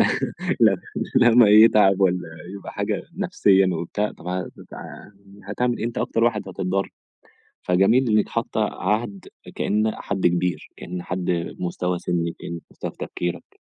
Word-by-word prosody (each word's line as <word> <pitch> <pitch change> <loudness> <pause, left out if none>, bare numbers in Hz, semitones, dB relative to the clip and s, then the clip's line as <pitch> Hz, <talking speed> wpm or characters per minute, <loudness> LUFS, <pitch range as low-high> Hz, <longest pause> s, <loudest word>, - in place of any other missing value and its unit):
لمّا - - +4 1.1
لمّا 120 -2 +6
يتعب 105 -2 +6
ولا 90 -2 +2 0.3
يبقى 100 - -8
حاجة - - -2
نفسيًا 95 -1 +3
وبتاع 85 +6 -2
طَب 90 - -13
هت 90 0 -3 1.0
هتعمل 120 +4 -1
إيه - - -3
أنت 120 - -4
أكتر 115 - 0
واحد 105 -5 0
هتتضر. 95 +1 -2 0.7
فجميل 110 +8 +3
إنِك 105 -1 +2
حاطة - - -2
عهد 105 -2 -2 0.3
كأن 105 +1 +1
حد 95 -3 0
كبير، 90 +1 -1
كأن 90 0 -6
حد 90 -1 -2
مستوى 90 0 -2
سنِّك، 85 -1 -2
كأن 85 0 -6
مستوى - - -6
في - - -29
تفكيرك. 85 -1 -5
95 Hz, 135 wpm, -23 LUFS, 90-105 Hz, 1.1 s, لمّا